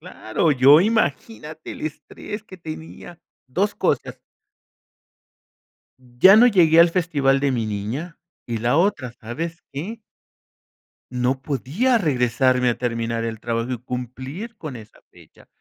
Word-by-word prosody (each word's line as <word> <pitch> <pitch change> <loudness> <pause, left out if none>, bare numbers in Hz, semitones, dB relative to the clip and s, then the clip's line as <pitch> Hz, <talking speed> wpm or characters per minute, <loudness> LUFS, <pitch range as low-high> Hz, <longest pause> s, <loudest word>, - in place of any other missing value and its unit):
Claro, 110 +9 -1
yo 140 +3 +7
imagínate 180 -5 -2
el - - -10
estrés 180 +7 -7
que 190 -3 -12
tenía, 165 +1 -10 0.3
2 195 +11 -1
cosas - - -1 1.8
ya 130 +10 +5
no 235 +3 +7
llegué 170 -8 +5
al 170 - +7
festival 150 -6 +1
de 140 -1 +1
mi 115 -3 -1
niña, 110 - -5 0.3
y 115 -1 -3
la 120 +4 +1
otra, 165 -10 0
¿sabes 165 +9 -6
qué? 190 +12 -6 1.1
No 125 +2 -1
podía 155 - 0
regresarme 125 - +2
a 120 - -3
terminar 115 -1 -2
el 115 -1 -4
trabajo 115 +2 -3
y - - -1
cumplir 130 - -7
con 155 -9 -7
esa 110 -2 -14
fecha. - - -20
140 Hz, 130 wpm, -22 LUFS, 125-170 Hz, 1.8 s, yo